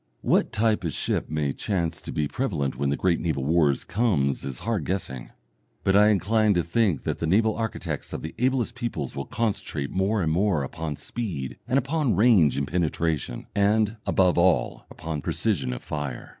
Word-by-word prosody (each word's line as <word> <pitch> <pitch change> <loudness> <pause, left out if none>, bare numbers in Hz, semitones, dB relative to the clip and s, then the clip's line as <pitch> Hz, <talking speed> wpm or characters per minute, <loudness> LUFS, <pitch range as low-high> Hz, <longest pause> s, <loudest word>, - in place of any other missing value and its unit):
What - - +2
type 110 -2 +1
of 80 -4 -2
ship - - -1
may 75 -3 -1
chance 85 -6 -2
to - - -7
be 75 -1 0
prevalent 80 - -2
when 70 +1 -1
the 70 - 0
great 90 -3 +2
naval 80 -5 -1
war 80 -1 +4 0.2
comes 90 - +1
is 65 -3 -5
hard 110 -6 -1
guessing, 70 -9 -4 0.5
but 95 - +3
I 105 +1 +7
incline 105 +1 +3
to 85 - +2
think 90 - +1
that - - -2
the 80 - -1
naval 110 +5 +3
architects 110 -1 -4
of - - -5
the 80 - -5
ablest 130 -1 +1
peoples 120 -1 -4
will 70 - -3
concentrate 95 -10 -2
more 95 +1 +1
and 80 - +1
more 90 -3 +2
upon 75 +2 -4
speed 85 - -5
and 125 +2 +2
upon 140 -2 +1
range 95 - +5
and 70 0 -1
penetration, 80 -6 -1
and, 105 +2 +2
above 90 -2 +3
all, 90 0 +2
upon 80 -2 -5
precision 75 - 0
of - - -6
fire. 75 -5 -5
90 Hz, 185 wpm, -25 LUFS, 75-110 Hz, 0.5 s, I